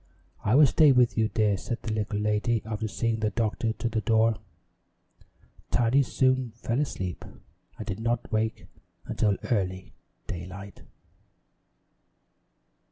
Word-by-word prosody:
"I 105 Hz, +3 st, +2 dB
will 150 Hz, +2 st, +8 dB
stay 145 Hz, +2 st, +5 dB
with 125 Hz, -2 st, +4 dB
you, 110 Hz, -1 st, +2 dB
dear," 105 Hz, -2 st, +1 dB
said 115 Hz, +5 st, -5 dB
the 110 Hz, -, -2 dB
little 105 Hz, -1 st, -2 dB
lady, 105 Hz, +2 st, 0 dB
after 110 Hz, 0 st, -3 dB
seeing 115 Hz, +1 st, -1 dB
the 110 Hz, -1 st, +1 dB
doctor 110 Hz, +1 st, -1 dB
to 115 Hz, -, -3 dB
the 115 Hz, -1 st, -1 dB
door. 110 Hz, -1 st, +3 dB, 1.3 s
Tiny 120 Hz, +3 st, +3 dB
soon 130 Hz, -2 st, +1 dB
fell 120 Hz, +1 st, -2 dB
asleep 95 Hz, -, -3 dB, 0.5 s
and 110 Hz, -, -6 dB
did 105 Hz, -1 st, -4 dB
not 115 Hz, +1 st, -2 dB
wake 110 Hz, +1 st, -1 dB, 0.4 s
until 105 Hz, -3 st, +1 dB
early 95 Hz, -4 st, -1 dB, 0.3 s
daylight. 95 Hz, +3 st, -8 dB
110 Hz, 130 wpm, -27 LUFS, 105-120 Hz, 1.3 s, will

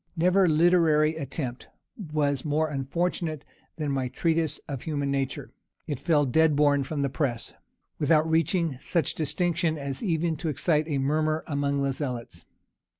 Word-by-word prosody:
Never 180 Hz, +3 st, +4 dB
literary 160 Hz, -1 st, +4 dB
attempt 135 Hz, -4 st, -5 dB, 0.3 s
was 150 Hz, -, -1 dB
more 155 Hz, +1 st, 0 dB
unfortunate 155 Hz, +2 st, -2 dB, 0.3 s
than 150 Hz, -3 st, -2 dB
my 135 Hz, -2 st, -1 dB
Treatise 160 Hz, +3 st, 0 dB
of 135 Hz, -3 st, -5 dB
Human 145 Hz, -3 st, -2 dB
Nature. 135 Hz, -1 st, -3 dB, 0.3 s
It 145 Hz, -4 st, -4 dB
fell 150 Hz, -3 st, +2 dB
dead 155 Hz, +4 st, +3 dB
born 145 Hz, -1 st, +3 dB
from 145 Hz, +1 st, -3 dB
the -, -, +2 dB
press, 130 Hz, -3 st, -2 dB, 0.5 s
without 155 Hz, +1 st, +3 dB
reaching 165 Hz, -3 st, +1 dB
such 170 Hz, +3 st, -1 dB
distinction 165 Hz, +1 st, 0 dB
as 140 Hz, -2 st, -5 dB
even 165 Hz, -5 st, 0 dB
to 160 Hz, +1 st, -3 dB
excite 155 Hz, +1 st, +1 dB
a 145 Hz, -3 st, -1 dB
murmur 155 Hz, +3 st, 0 dB
among 140 Hz, -1 st, -1 dB
the 135 Hz, -1 st, 0 dB
zealots. 125 Hz, -4 st, -5 dB
150 Hz, 150 wpm, -27 LUFS, 140-160 Hz, 0.5 s, Never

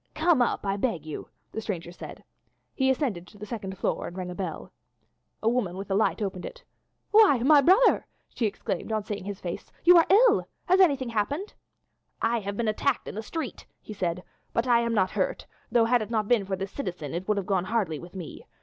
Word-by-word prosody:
"Come 315 Hz, -3 st, +3 dB
up, 240 Hz, -, 0 dB
I 195 Hz, 0 st, 0 dB
beg 200 Hz, -, -1 dB
you," 155 Hz, -, -7 dB, 0.2 s
the 220 Hz, -, -4 dB
stranger 175 Hz, -6 st, -4 dB
said. 180 Hz, -, -10 dB, 0.5 s
He 265 Hz, -1 st, +1 dB
ascended 245 Hz, -, -1 dB
to -, -, -16 dB
the 210 Hz, -, -7 dB
second 195 Hz, -4 st, -6 dB
floor -, -, -1 dB
and 175 Hz, -, -9 dB
rang 180 Hz, -1 st, -4 dB
at -, -, -5 dB
the 195 Hz, -, -3 dB
bell. 165 Hz, -4 st, -6 dB, 0.7 s
A -, -, +1 dB
woman 225 Hz, -7 st, 0 dB
with 195 Hz, 0 st, -6 dB
a -, -, +3 dB
light 215 Hz, +2 st, +1 dB
opened 190 Hz, -2 st, -4 dB
it. -, -, -9 dB, 0.5 s
"Why, 420 Hz, -, +7 dB
my 290 Hz, +1 st, +7 dB
brother," 380 Hz, -, +4 dB, 0.3 s
she 230 Hz, -, 0 dB
exclaimed 195 Hz, 0 st, -4 dB
on 215 Hz, -1 st, 0 dB
seeing 205 Hz, -2 st, -5 dB
his 200 Hz, -1 st, -5 dB
face, 175 Hz, -2 st, -6 dB
"you 355 Hz, +1 st, +8 dB
are 330 Hz, -, +6 dB
ill! 450 Hz, +6 st, +5 dB, 0.2 s
Has 370 Hz, +2 st, +4 dB
anything 280 Hz, -9 st, +4 dB
happened?" 285 Hz, -, -2 dB, 0.7 s
"I 235 Hz, +1 st, +1 dB
have 200 Hz, -1 st, -5 dB
been 235 Hz, -, 0 dB
attacked 245 Hz, +5 st, 0 dB
in -, -, -5 dB
the 220 Hz, -, -4 dB
street," 305 Hz, +3 st, -6 dB
he 215 Hz, -, -9 dB
said, 180 Hz, -3 st, -2 dB, 0.3 s
"but 230 Hz, -, +1 dB
I 240 Hz, -2 st, +4 dB
am 235 Hz, -1 st, 0 dB
not 190 Hz, -2 st, +2 dB
hurt, -, -, -1 dB, 0.3 s
though, 235 Hz, -1 st, +4 dB
had 240 Hz, 0 st, +3 dB
it 215 Hz, -, -5 dB
not 215 Hz, -3 st, 0 dB
been 230 Hz, -4 st, +3 dB
for 190 Hz, 0 st, -2 dB
this 195 Hz, +1 st, -5 dB
citizen 175 Hz, -, -5 dB
it 175 Hz, +3 st, -4 dB
would 210 Hz, -1 st, +1 dB
have 200 Hz, -, -2 dB
gone 185 Hz, -2 st, 0 dB
hardly 190 Hz, -8 st, -1 dB
with 175 Hz, +2 st, -12 dB
me. 180 Hz, -4 st, -8 dB
215 Hz, 225 wpm, -27 LUFS, 190-260 Hz, 0.7 s, you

